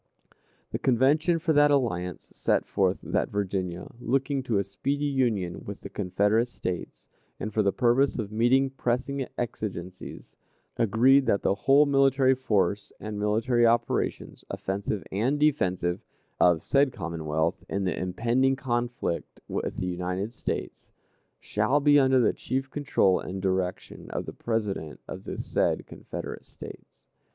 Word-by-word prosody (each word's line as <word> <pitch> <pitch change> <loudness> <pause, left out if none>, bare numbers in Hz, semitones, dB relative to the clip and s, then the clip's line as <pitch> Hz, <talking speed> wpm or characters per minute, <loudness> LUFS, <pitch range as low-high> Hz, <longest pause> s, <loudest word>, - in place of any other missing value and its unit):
The - - -2
Convention 145 +7 +3
for 165 0 +1
that 145 0 +5
alliance 90 - 0
set - - +1
forth 95 -2 0
that - - 0
Virginia, 95 -3 -2
looking 135 +3 0
to 120 -5 0
a 100 - +2
speedy 140 +9 -2
union 115 -11 0
with 100 -1 -8
the - - -8
Confederate 105 +4 +1
States, 90 -7 -6 0.3
and 110 - -4
for 110 - +2
the 100 -1 +2
purpose 125 +6 +2
of 110 -4 -4
meeting 130 +5 +3
pressing 135 +1 -2
exigencies, 95 -6 -6 0.4
agreed 130 +5 +4
that 100 - +2
"the - - +3
whole 135 +9 +4
military 135 -1 +4
force 105 -6 0
and 105 -1 -5
military 115 +3 +2
operations, 115 0 0
offensive 100 +1 -3
and 125 +9 0
defensive, 90 -12 +1 0.4
of 85 -2 +4
said 140 -1 +3
Commonwealth, 80 -3 -2
in 100 0 -1
the 90 - 0
impending 120 +8 +1
conflict 120 -8 -3
with - - -3
the - - -2
United 90 +4 -3
States, - - -5 0.5
shall 110 +8 +1
be 145 0 +5
under 130 -1 +4
the 120 - +3
chief 135 +1 -3
control 140 -10 +2
and 95 +1 -5
direction 95 -1 -2
of - - -4
the - - -7
President 105 -9 -3
of - - -8
the - - -5
said - - 0
Confederate - - -8
States." - - -12
115 Hz, 145 wpm, -27 LUFS, 95-135 Hz, 0.5 s, that